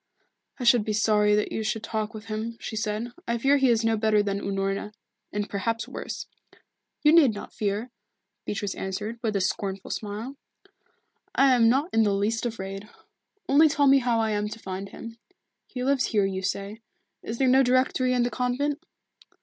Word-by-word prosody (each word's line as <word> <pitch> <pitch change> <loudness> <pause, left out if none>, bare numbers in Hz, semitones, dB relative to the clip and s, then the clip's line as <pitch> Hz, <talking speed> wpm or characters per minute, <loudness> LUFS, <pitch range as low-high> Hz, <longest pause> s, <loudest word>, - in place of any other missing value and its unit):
"I - - -4
should 235 -2 +5
be 215 - -2
sorry 210 -1 +3
that 210 - 0
you - - -2
should 220 0 -2
talk 220 -1 -3
with 215 0 -9
him," 225 +1 -4
she - - -6
said. 220 +2 -2 0.2
"I 235 - 0
fear 275 +4 +3
he 270 -2 +3
is 230 -1 +2
no 225 0 +3
better 215 -1 +2
than 200 -1 -2
Unorna, 195 +1 -2 0.4
and 205 0 -2
perhaps 225 +3 -2
worse." - - -6 0.8
"You 300 +1 +6
need 285 -10 +6
not 205 - -8
fear," 210 +4 -2 0.5
Beatrice 205 -1 -3
answered, 210 +4 -5
with 215 -2 -1
a 200 - +1
scornful 195 +1 -2
smile. 220 +6 -5 1.0
"I 270 -1 +5
am 230 -2 +5
not 280 +9 +1
in 225 - +4
the 205 -2 +2
least 225 +4 0
afraid. 195 -2 -6 0.6
Only 305 +3 +6
tell 290 -1 +2
me 275 0 +6
how 240 -2 +1
I 220 -1 +1
am 210 0 -1
to 215 - -7
find 195 -2 -6
him. 230 0 -10 0.5
He 250 -1 -5
lives 275 0 +2
here, 205 -3 +1
you 190 -1 -2
say 200 +3 -4 0.4
is 225 - -5
there 265 - +2
no 260 +1 +6
directory 255 0 +2
in 245 -1 +2
the 245 - -1
convent?" 270 +4 -1
225 Hz, 190 wpm, -26 LUFS, 205-250 Hz, 1.0 s, You